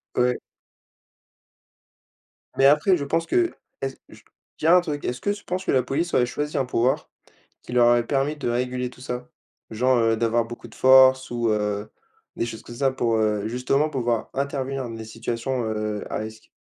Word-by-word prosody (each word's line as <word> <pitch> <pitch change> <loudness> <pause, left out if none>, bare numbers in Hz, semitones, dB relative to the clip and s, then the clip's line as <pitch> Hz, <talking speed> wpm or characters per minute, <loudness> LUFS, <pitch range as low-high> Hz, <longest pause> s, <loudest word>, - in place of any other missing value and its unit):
Ouais. 125 0 +2 2.2
Mais 135 - +4
après 150 +6 +4
je 145 - -4
pense 165 +3 0
que 350 - +1 0.3
est-ce 135 -1 -3
je - - -15 0.4
tiens 165 +3 +5
un 180 - +6
truc, 150 -4 -4
est-ce 125 - -3
que 205 - 0
tu 205 0 -6
penses 185 +1 -4
que - - +1
la 130 - +4
police 160 +7 -2
aurait 125 - +4
choisi 150 +3 -3
un 130 - +1
pouvoir, 125 +1 0 0.5
qui - - -8
leur 120 -1 +5
aurait 120 -1 +4
permis 140 +2 0
de 145 - -4
réguler 125 +1 -1
tout 125 - -16
ça? 125 -1 -5 0.4
Genre, 125 +3 +2
heu, 115 -1 +3
d'avoir 115 +1 +1
beaucoup 120 0 -9
de 110 - -16
force 130 -1 +6
ou 120 -1 0
heu, 105 -1 -1 0.5
des - - -1
choses 115 -2 -7
comme 120 - -10
ça 135 +2 +1
pour, 120 -3 0
heu, 105 -1 0
justement 130 +6 +1
pour 135 -4 -3
pouvoir 120 -1 -1
intervenir 135 -1 -2
dans 120 - -6
les 110 0 -7
situations, 115 +3 -3
heu, 110 -1 -2
à - - -1
risque. 110 0 -8
125 Hz, 195 wpm, -24 LUFS, 115-140 Hz, 2.2 s, un